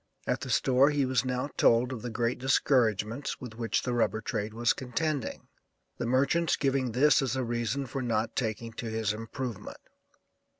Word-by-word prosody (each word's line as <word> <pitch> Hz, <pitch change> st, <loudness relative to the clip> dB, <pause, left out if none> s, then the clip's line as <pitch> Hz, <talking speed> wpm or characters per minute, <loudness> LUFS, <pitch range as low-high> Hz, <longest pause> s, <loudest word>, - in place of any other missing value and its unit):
At -, -, -1 dB
the -, -, -5 dB
store 135 Hz, +2 st, +4 dB
he 145 Hz, -2 st, +1 dB
was 130 Hz, -2 st, +1 dB
now 130 Hz, +2 st, -2 dB
told 120 Hz, +2 st, +4 dB
of 115 Hz, -, -6 dB
the 125 Hz, -, -4 dB
great 115 Hz, +2 st, -1 dB
discouragements 125 Hz, -2 st, +1 dB
with 125 Hz, -3 st, -8 dB
which 115 Hz, 0 st, -1 dB
the 125 Hz, -, -1 dB
rubber 115 Hz, -2 st, +1 dB
trade 105 Hz, -1 st, -3 dB
was 115 Hz, +1 st, +2 dB
contending, 140 Hz, +1 st, -3 dB, 0.5 s
the 120 Hz, -, -2 dB
merchants 140 Hz, +7 st, +2 dB
giving 135 Hz, -4 st, 0 dB
this 145 Hz, +5 st, +5 dB
as 130 Hz, -2 st, -1 dB
a 130 Hz, -, -1 dB
reason 120 Hz, +3 st, -2 dB
for 130 Hz, +2 st, -4 dB
not 115 Hz, -2 st, -1 dB
taking 115 Hz, -1 st, -2 dB
to 115 Hz, -, -5 dB
his 110 Hz, -1 st, -1 dB
improvement. 115 Hz, 0 st, -6 dB
125 Hz, 175 wpm, -29 LUFS, 115-135 Hz, 0.5 s, this